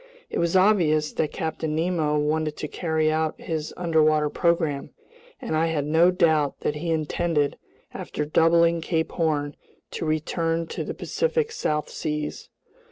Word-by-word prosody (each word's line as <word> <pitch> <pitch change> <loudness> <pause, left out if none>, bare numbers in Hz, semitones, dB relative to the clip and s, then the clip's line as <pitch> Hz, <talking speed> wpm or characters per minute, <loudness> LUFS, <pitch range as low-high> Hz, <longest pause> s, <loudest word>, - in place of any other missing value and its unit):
It - - -1
was 170 +1 +1
obvious 170 -6 +3
that 155 - -1
Captain 160 -2 -3
Nemo 160 -2 +1
wanted 155 +1 0
to 150 - -4
carry 160 -1 0
out 155 0 -1
his 155 -2 -4
underwater 155 -3 +2
program, 165 -5 0 0.5
and 240 - -3
I 160 +1 +2
had 155 -3 -1
no 160 +4 +4
doubt 160 -6 +2
that 150 - -1
he 165 +3 -4
intended, 155 -1 0 0.4
after 150 - -4
doubling 165 +2 +3
Cape 160 -1 -1
Horn, 150 -4 -1 0.4
to - - -4
return 165 +2 -1
to - - -4
the - - -5
Pacific 470 -2 -1
South 150 - -1
Seas. 150 -1 -4
160 Hz, 150 wpm, -25 LUFS, 150-170 Hz, 0.5 s, no